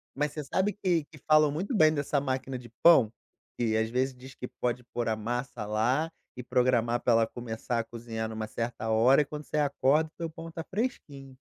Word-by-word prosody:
Mas 150 +1 0
você 150 - -4
sabe 190 +8 0
que 175 -6 0
que 155 - -16
falam 155 -1 +5
muito 185 - -2
bem 155 -5 +5
dessa 145 -1 0
máquina 130 -1 -2
de 120 -1 -12
pão? 130 -11 +7 0.5
Que 115 -2 +1
às 110 0 0
vezes 130 +3 0
diz 130 +2 -12
que 125 - -6
pode 125 0 -1
pôr 120 - -1
a 110 - +1
massa 120 +1 -4
lá 125 +10 +1 0.3
e 125 - -5
programar 120 -1 +2
para 120 - +3
ela 115 0 +4
começar 120 0 -4
a - - 0
cozinhar 115 -1 -5
numa 110 -1 -4
certa 115 0 -4
hora 120 +6 +5
e - - -1
quando 150 +1 -7
você - - -3
acorda 145 +1 +2
o - - -45
teu 165 -1 -3
pão 165 +1 -9
tá 165 0 -5
fresquinho. 145 - -5
130 Hz, 215 wpm, -29 LUFS, 115-150 Hz, 0.5 s, pão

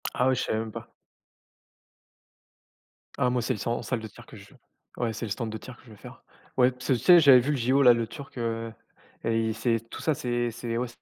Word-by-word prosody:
Ah 125 - +2
ouais, 130 - +3
je - - -1
savais 110 - -1
même 110 -1 -5
pas. - - -10 2.3
Ah 125 - +2
moi 125 0 0
c'est - - 0
le 105 - -7
san 115 - -1
en - - -3
salle 125 - -2
de 110 - -7
tir 120 +3 -15
que - - -14
je 100 0 -15
veux. - - -22 0.4
Ouais, 115 -2 -1
c'est 115 - -5
le 110 - -6
stand 115 -3 -3
de 110 - -5
tir 125 +2 -11
que - - -21
je 115 - -15
veux 105 - -12
faire. - - -13 0.3
Ouais, 125 0 +5
parce 125 0 -10
que 135 - +3
tu 120 - 0
sais 175 +9 +7
j'avais 140 -5 +8
vu 140 +5 -1
les 145 - 0
JO 130 +4 +2
là, 125 -2 +8
le 115 -1 -2
turc, 135 +2 -11
heu, 115 -1 -3 0.5
et 115 -1 0
c'est 115 0 0
tout - - -8
ça, 155 - +1
c'est 120 -1 -1
c'est 115 0 -4
ouais 125 +1 -1
120 Hz, 260 wpm, -27 LUFS, 115-125 Hz, 2.3 s, j'avais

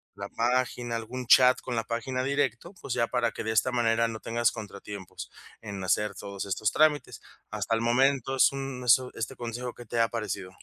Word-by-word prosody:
la - - -6
página, 120 0 0
algún 125 +3 -6
chat 125 +1 +7
con 125 -2 -4
la 115 - -1
página 120 +2 -2
directo, 140 - -1
pues, 125 - -3
ya 120 -2 +1
para 120 -3 0
que - - -6
de 110 - 0
esta 110 +4 +2
manera 115 -1 +2
no 110 -1 -6
tengas 120 0 +1
contratiempos 100 -2 -8 0.3
en 100 -3 -6
hacer 105 +3 +1
todos 100 -1 -6
estos 100 +2 0
trámites. 155 -1 +2 0.3
Hasta 115 - -2
el 115 - -1
momento 135 +2 +2
es 135 - +5
un 135 -2 -5
eso, 125 +2 +4
este 115 +4 -4
consejo, 120 +1 -5
¿qué 120 - -12
te 115 +2 -2
ha 115 - +2
parecido? 105 -5 -4
120 Hz, 200 wpm, -28 LUFS, 110-130 Hz, 0.3 s, chat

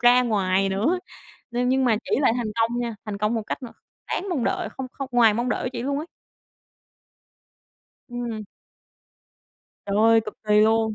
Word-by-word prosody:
ra 245 +1 +6
ngoài 195 -4 +1
nữa, 220 - +1 0.5
nên 245 +1 0
nhưng 260 +1 +2
mà 230 -3 +3
chị - - +3
lại 265 - +4
thành 240 -2 -2
công 235 +2 +1
nha, 235 -2 -3
thành 210 -2 -5
công 210 +3 +1
một 225 - -1
cách 240 - -5
m - - -5 0.4
đáng 390 - -2
mong 280 -9 0
đợi - - -1
không 265 +3 -6
không 275 -1 -5
ngoài 230 -3 +5
mong 240 +2 -1
đợi - - -1
của 255 - -2
chị 235 -2 -4
luôn 280 +2 -1
á. 315 - -6 2.0
Ừm. 240 -3 -4 1.4
Trời 200 0 -1
ơi, 225 +1 +6
cực - - -7
kỳ 210 0 +4
luôn! 220 0 +3
235 Hz, 185 wpm, -24 LUFS, 215-250 Hz, 2.0 s, ra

